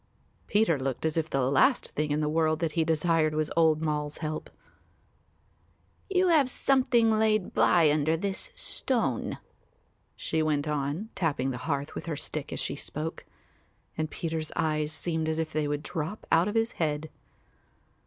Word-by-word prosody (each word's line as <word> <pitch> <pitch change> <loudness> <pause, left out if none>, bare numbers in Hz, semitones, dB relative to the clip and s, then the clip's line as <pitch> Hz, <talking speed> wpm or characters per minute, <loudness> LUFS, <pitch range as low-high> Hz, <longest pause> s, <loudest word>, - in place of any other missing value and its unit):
Peter 205 -8 +2
looked 130 +2 -3
as 160 - 0
if 165 0 0
the 135 - 0
last 235 - +3
thing 150 0 -1
in 150 +1 0
the 150 - 0
world 155 0 +2
that 165 -1 -1
he 160 +1 +1
desired 160 -1 +2
was 155 0 -1
old 160 -1 +3
Moll's 150 -1 -2
help. 155 -1 -4 1.6
"You 370 -1 +3
have 295 -6 +4
something 250 -4 +3
laid 215 -2 +2
by 165 -4 +4
under 155 +2 +2
this 195 - -3
stone," - - -1 0.8
she 160 - -1
went 155 -1 0
on, 150 +8 -2
tapping 145 -6 0
the 125 - -5
hearth 140 0 -1
with - - -7
her 155 -3 -2
stick 150 0 -4
as - - -4
she 140 - -2
spoke; 155 +3 -5 0.7
and 155 -1 -2
Peter's 160 -2 -3
eyes 155 -2 0
seemed 160 0 -1
as 160 - -1
if 160 -1 -2
they 155 -1 0
would 145 0 -2
drop 165 +6 -4
out 165 +3 +4
of 210 - -3
his 225 +1 +2
head. 155 0 -1
160 Hz, 165 wpm, -28 LUFS, 150-175 Hz, 1.6 s, have